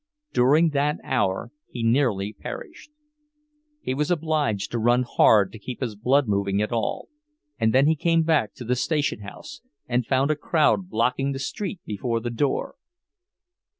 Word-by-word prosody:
During 150 +7 +4
that 150 0 0
hour 95 +5 -1 0.2
he 120 - -5
nearly 115 -5 +1
perished. 110 - -9 0.9
He - - -1
was 150 +2 -1
obliged 155 - 0
to 120 - -1
run 120 +2 +3
hard 105 -4 +4
to 110 - -11
keep 125 +4 -7
his 120 -5 -3
blood 130 +5 +2
moving 100 -1 0
at 105 +2 -1
all—and 150 - -4
then 130 +3 +4
he 160 +2 +3
came 165 +2 +2
back 155 -9 +1
to 120 - -9
the 125 +2 +1
station 145 0 0
house 105 +8 -10 0.3
and 125 0 +1
found 135 +2 +2
a - - +1
crowd 160 +4 +1
blocking 125 +3 0
the - - -4
street 195 +6 -4
before 115 +3 -2
the 120 +1 -4
door! 135 +4 -1
130 Hz, 160 wpm, -24 LUFS, 115-150 Hz, 0.9 s, During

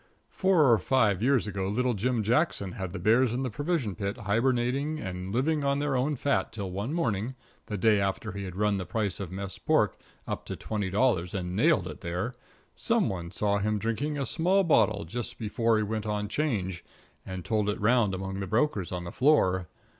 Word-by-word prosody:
Four 190 -4 +3
or 115 - +5
five 105 -3 +2
years 130 -1 +3
ago 100 -2 -3
little 125 +5 +1
Jim 115 +2 0
Jackson 115 - +1
had 95 0 -5
the 100 - -5
bears 115 +6 +3
in 130 - -1
the 130 - -2
provision 145 - -1
pit 100 +1 -3
hibernating 125 +7 0
and 95 -3 -5
living 145 +6 +1
on 140 0 +2
their 145 -1 0
own 135 +4 +1
fat 125 -7 0
till 100 -4 -5
one 100 +8 -3
morning, 125 - -1 0.3
the 105 - -3
day 105 0 +4
after 100 +3 -2
he 100 0 -5
had 90 -1 -7
run 105 0 +1
the 90 - -4
price 100 0 -1
of 95 -3 -5
mess 95 +1 -6
pork - - +2 0.3
up - - -3
to - - -5
twenty 105 -3 -3
dollars 100 -3 +1
and 90 -1 -3
nailed 120 - +3
it 75 -3 -8
there, 90 +8 -3 0.4
some - - +1
one 85 -3 -4
saw 100 +2 0
him 105 +1 0
drinking 115 +8 -2
a 140 - -1
small 185 +6 +2
bottle 105 - +3
just 120 +8 -5
before 115 0 +1
he 110 - +1
went 110 0 -3
on 105 -1 -1
'Change, 100 - -2 0.4
and 95 -1 -6
told 105 -3 +1
it 105 - -2
round 105 -2 +3
among 95 +1 -4
the 95 - -3
brokers 110 - 0
on 90 -1 -3
the 85 - -6
floor. 95 - +3
105 Hz, 205 wpm, -28 LUFS, 95-130 Hz, 0.4 s, or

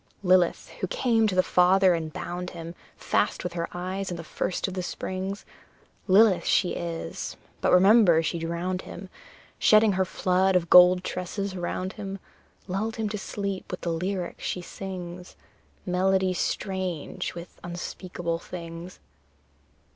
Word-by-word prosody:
Lilith, 180 -2 +3
who - - -1
came 235 - +2
to 195 - -1
the 185 - +4
father 185 +1 +4
and 160 -2 -3
bound 180 +3 -5
him 165 0 -7 0.2
Fast - - 0
with 180 -1 -4
her 170 -1 -3
eyes 185 +2 -4
in 175 - -4
the 165 - -7
first 180 +4 -2
of 190 - -5
the 185 - -2
springs; 190 +2 -4 0.6
Lilith 195 0 +5
she 180 - +3
is, 165 - -5 0.2
but - - +2
remember 185 -3 +6
she 170 +1 -2
drowned 170 +3 -2
him, 185 +1 -9 0.5
Shedding 215 0 +6
her 190 0 +1
flood 185 +1 +1
of 170 -2 +1
gold 180 0 +8
tresses 185 +2 -4
around 185 +1 -3
him 195 -2 -6 0.5
Lulled 205 +4 -2
him 220 -2 -2
to 210 - -3
sleep 200 -2 -4
with 180 - -5
the 170 - -2
lyric 180 +1 -3
she - - -2
sings: 180 -1 -8 0.5
Melody 185 +1 +2
strange 185 -4 -3
with 170 0 -10
unspeakable 175 -1 -4
things! 170 0 -8
185 Hz, 145 wpm, -26 LUFS, 175-195 Hz, 0.6 s, gold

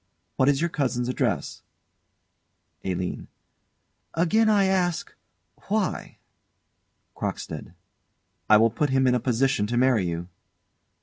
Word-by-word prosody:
What 130 - +3
is 140 0 +2
your 170 - +1
cousin's 125 -4 -1
address? 125 - -2 1.2
ALINE. 90 -1 -3 0.9
Again 215 +7 +3
I 205 -2 +4
ask 180 -3 0 0.5
why? 205 -3 -2 1.0
CROCKSTEAD. - - -5 0.7
I 110 - +8
will 115 +1 +4
put 145 +6 0
him 130 0 +2
in 125 - +4
a 125 - +2
position 125 -2 +1
to 120 +2 -1
marry 125 -7 +3
you. 85 0 -4
130 Hz, 115 wpm, -25 LUFS, 115-170 Hz, 1.2 s, I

